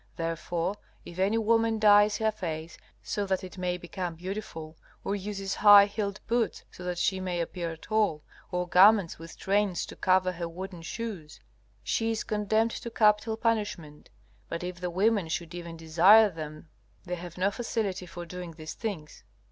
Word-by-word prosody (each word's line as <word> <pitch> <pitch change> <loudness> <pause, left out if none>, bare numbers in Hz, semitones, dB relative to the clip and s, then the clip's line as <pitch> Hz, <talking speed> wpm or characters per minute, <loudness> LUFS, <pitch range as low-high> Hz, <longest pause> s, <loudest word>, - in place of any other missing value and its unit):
Therefore, 165 +3 -2 0.3
if 175 +1 -9
any 200 +4 +2
woman 225 0 +2
dyes 210 -1 +5
her 220 -1 +1
face, 165 -5 -5 0.3
so 205 -1 -2
that 190 -1 0
it 185 0 -9
may 180 -1 -1
become 175 -1 -5
beautiful, 170 -3 -6 0.3
or 200 - -1
uses 195 -1 -4
high 205 -1 +8
heeled 205 0 -3
boots 235 -1 0
so 180 - -11
that 180 0 -3
she 190 +2 +1
may 180 -2 -2
appear 170 -1 -4
tall, 205 -6 0 0.3
or 180 0 -1
garments 190 -1 +5
with 165 0 -11
trains 200 -2 0
to - - -10
cover 185 0 +2
her 170 -1 -5
wooden 180 +1 -7
shoes, 180 -4 -6 0.4
she 225 0 0
is 225 -1 -1
condemned 215 +2 +1
to 235 - -6
capital 220 0 +2
punishment. 205 -10 -2 0.4
But 170 +1 -4
if 180 -1 -5
the 180 - -2
women 200 +1 +1
should 170 +1 -4
even 170 -1 -7
desire 180 +7 +6
them 155 -1 -8 0.4
they 180 - -4
have 175 -1 -7
no 190 +2 +2
facility 205 -5 -3
for 175 0 -8
doing 180 -1 -7
these 155 -1 -8
things. 185 - -6
185 Hz, 170 wpm, -28 LUFS, 170-210 Hz, 0.4 s, high